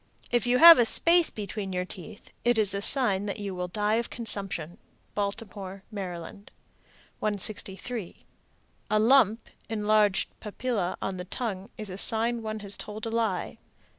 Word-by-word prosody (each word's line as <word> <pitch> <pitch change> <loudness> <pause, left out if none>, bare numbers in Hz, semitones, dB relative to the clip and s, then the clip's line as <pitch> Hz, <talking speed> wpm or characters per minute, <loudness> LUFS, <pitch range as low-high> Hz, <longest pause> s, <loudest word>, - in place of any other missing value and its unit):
If 240 0 +1
you 245 +1 +3
have 335 +1 +10
a 240 - +5
space 340 +5 +4
between 205 -2 -5
your 180 0 -1
teeth, 205 +3 -11
it 240 -1 +3
is 210 -3 +3
a 200 - -2
sign 205 -5 +2
that 200 - -3
you 200 -2 -5
will 180 0 -3
die 210 +3 0
of 235 - -2
consumption. 195 -6 -1 0.3
Baltimore, 200 -2 -5
Md. 185 0 -7 0.7
163. 205 0 -3 0.6
A 215 - +2
lump 225 -1 +4 0.2
(enlarged 210 -2 +2
papilla) 210 -3 -3
on 190 -1 -3
the 180 - -6
tongue 195 -2 -4
is 215 -3 -6
a 185 - -6
sign 230 +2 +2
one 215 -1 -5
has 200 -1 -2
told 215 +1 -7
a 225 - -3
lie. 225 -5 -1
210 Hz, 155 wpm, -27 LUFS, 195-230 Hz, 0.7 s, have